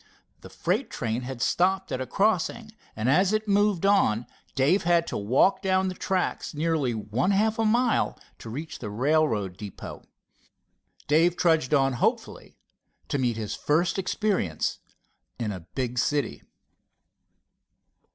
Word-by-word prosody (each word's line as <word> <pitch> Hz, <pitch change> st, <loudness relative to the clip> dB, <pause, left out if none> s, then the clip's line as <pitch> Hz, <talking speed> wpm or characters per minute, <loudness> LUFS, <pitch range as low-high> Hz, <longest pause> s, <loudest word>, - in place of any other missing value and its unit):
The -, -, -12 dB
freight -, -, -1 dB
train 115 Hz, +1 st, -3 dB
had 125 Hz, -1 st, -4 dB
stopped 190 Hz, +2 st, +1 dB
at 130 Hz, -, -2 dB
a 130 Hz, -, -4 dB
crossing, 215 Hz, +2 st, 0 dB, 0.2 s
and 110 Hz, +2 st, -2 dB
as 185 Hz, +9 st, +3 dB
it 215 Hz, 0 st, 0 dB
moved 205 Hz, -2 st, +2 dB
on 125 Hz, -, +3 dB, 0.3 s
Dave 150 Hz, +9 st, +3 dB
had 170 Hz, -1 st, +2 dB
to -, -, -4 dB
walk 125 Hz, -, +2 dB
down 190 Hz, 0 st, +1 dB
the -, -, -4 dB
tracks 185 Hz, -4 st, -2 dB
nearly 150 Hz, -6 st, 0 dB
one 110 Hz, -, -1 dB
half 215 Hz, +3 st, +2 dB
a 225 Hz, -, +2 dB
mile 235 Hz, +2 st, +2 dB, 0.2 s
to 115 Hz, -, -9 dB
reach 150 Hz, +8 st, -6 dB
the 105 Hz, -, -5 dB
railroad 115 Hz, -, +1 dB
depot. 100 Hz, -2 st, -8 dB, 1.1 s
Dave 165 Hz, +4 st, +3 dB
trudged 160 Hz, -4 st, +2 dB
on 135 Hz, -1 st, +2 dB
hopefully 120 Hz, -, -2 dB, 0.5 s
to 140 Hz, -, -1 dB
meet 120 Hz, -3 st, 0 dB
his 110 Hz, -2 st, -4 dB
first 170 Hz, +5 st, +1 dB
experience 180 Hz, -, -1 dB, 0.6 s
in 110 Hz, -3 st, -2 dB
a 90 Hz, -4 st, -8 dB
big 125 Hz, -2 st, -2 dB
city. 145 Hz, +4 st, -1 dB
155 Hz, 140 wpm, -26 LUFS, 120-190 Hz, 1.1 s, as